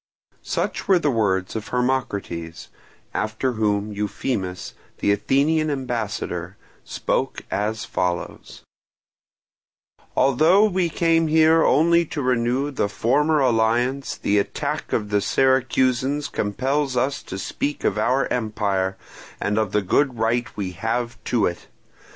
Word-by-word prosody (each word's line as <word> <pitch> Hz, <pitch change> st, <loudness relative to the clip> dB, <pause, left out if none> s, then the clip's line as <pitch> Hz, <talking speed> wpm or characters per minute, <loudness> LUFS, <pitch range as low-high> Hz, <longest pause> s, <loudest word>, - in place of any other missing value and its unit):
Such -, -, -3 dB
were 190 Hz, -, +5 dB
the 150 Hz, -4 st, +1 dB
words 100 Hz, -5 st, 0 dB
of 110 Hz, -2 st, -4 dB
Hermocrates; 100 Hz, -10 st, -2 dB, 0.4 s
after 110 Hz, +4 st, -1 dB
whom 105 Hz, -2 st, -1 dB
Euphemus, 100 Hz, -2 st, -3 dB, 0.2 s
the 100 Hz, -, +1 dB
Athenian 145 Hz, +9 st, +2 dB
ambassador, 110 Hz, -, -3 dB, 0.3 s
spoke -, -, -2 dB
as 105 Hz, +2 st, -1 dB
follows: 90 Hz, -1 st, -3 dB, 1.5 s
"Although 160 Hz, -, +5 dB
we 185 Hz, -3 st, 0 dB
came 165 Hz, 0 st, +2 dB
here 160 Hz, +1 st, +5 dB
only 170 Hz, +4 st, +4 dB
to 150 Hz, -2 st, -4 dB
renew 125 Hz, +3 st, +1 dB
the 105 Hz, -7 st, -1 dB
former 145 Hz, +8 st, +2 dB
alliance, 120 Hz, +2 st, +1 dB
the 105 Hz, 0 st, +1 dB
attack 150 Hz, +8 st, -3 dB
of 105 Hz, -2 st, -1 dB
the 105 Hz, 0 st, +2 dB
Syracusans 130 Hz, +3 st, +1 dB
compels 130 Hz, +6 st, -1 dB
us 135 Hz, +3 st, 0 dB
to -, -, -7 dB
speak 145 Hz, +8 st, -3 dB
of -, -, +1 dB
our 125 Hz, +5 st, +2 dB
empire 100 Hz, -5 st, -1 dB, 0.4 s
and 105 Hz, +2 st, 0 dB
of 110 Hz, -3 st, -1 dB
the 105 Hz, -1 st, +1 dB
good 130 Hz, +6 st, +1 dB
right 115 Hz, +2 st, +1 dB
we 95 Hz, -3 st, -3 dB
have 115 Hz, +6 st, -3 dB
to 115 Hz, -4 st, +1 dB
it. 85 Hz, -, -4 dB
120 Hz, 125 wpm, -23 LUFS, 105-140 Hz, 1.5 s, were